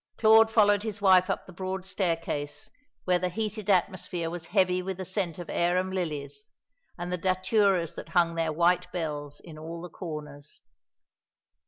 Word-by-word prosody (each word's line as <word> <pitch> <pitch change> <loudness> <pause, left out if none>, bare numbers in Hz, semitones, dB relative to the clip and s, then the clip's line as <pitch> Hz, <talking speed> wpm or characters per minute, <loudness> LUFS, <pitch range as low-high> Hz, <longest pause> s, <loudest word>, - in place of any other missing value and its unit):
Claude 220 0 +6
followed 205 -2 +4
his 215 -1 -4
wife 185 -1 +5
up 195 - -2
the 185 - -13
broad 185 +1 -4
staircase, 165 -6 -2 0.3
where 180 -1 +2
the 180 0 -1
heated 215 +1 -3
atmosphere 180 -3 0
was 175 -1 -6
heavy 185 -2 +2
with 190 0 -4
the 190 - -5
scent 185 -2 -2
of 175 - -7
arum 180 +2 +1
lilies, 145 -6 -4 0.5
and 175 +1 -4
the 180 - -2
daturas 185 -1 +2
that - - -9
hung 170 -2 +2
their 165 -1 0
white 175 +3 +2
bells 150 -4 -4
in 155 -3 -11
all 165 +2 -7
the 175 +1 -9
corners. 150 -4 -8
180 Hz, 165 wpm, -28 LUFS, 165-190 Hz, 0.5 s, Claude